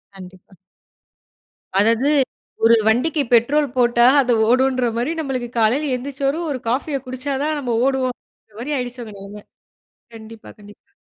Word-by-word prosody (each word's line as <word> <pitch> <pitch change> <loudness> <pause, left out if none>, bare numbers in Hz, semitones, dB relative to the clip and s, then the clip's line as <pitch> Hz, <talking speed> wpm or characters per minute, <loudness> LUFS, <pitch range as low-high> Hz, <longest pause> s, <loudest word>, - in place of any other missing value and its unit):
கண்டிப்பா. 185 0 -14 1.2
அதாவது 230 +6 +2 0.5
ஒரு 230 +1 +6
வண்டிக்கு 285 +8 +1
பெட்ரோல் 285 +6 +3
போட்டா, 240 -1 +3 0.2
அது 250 -2 +1 0.2
ஓடுன்ற 255 0 +2
மாரி 245 +6 -1
நம்மளுக்கு 260 -5 -3
காலையில 260 +7 +1
எந்திரிச்சரும் 275 +5 -3
ஒரு 265 - -3
காஃபிய 275 +4 -1
குடிச்சாதான் 280 +4 -3
நம்ம 245 -4 -2
ஓடுவோன்ற 255 -5 -5
மாரி 290 +4 -3
ஆயிருச்சு 245 -1 -5
உங்க 215 - -10
நெலைம. 205 +1 -11 0.7
கண்டிப்பா, 220 0 -12
கண்டிப்பா. 205 - -17
250 Hz, 125 wpm, -20 LUFS, 225-275 Hz, 1.2 s, ஒரு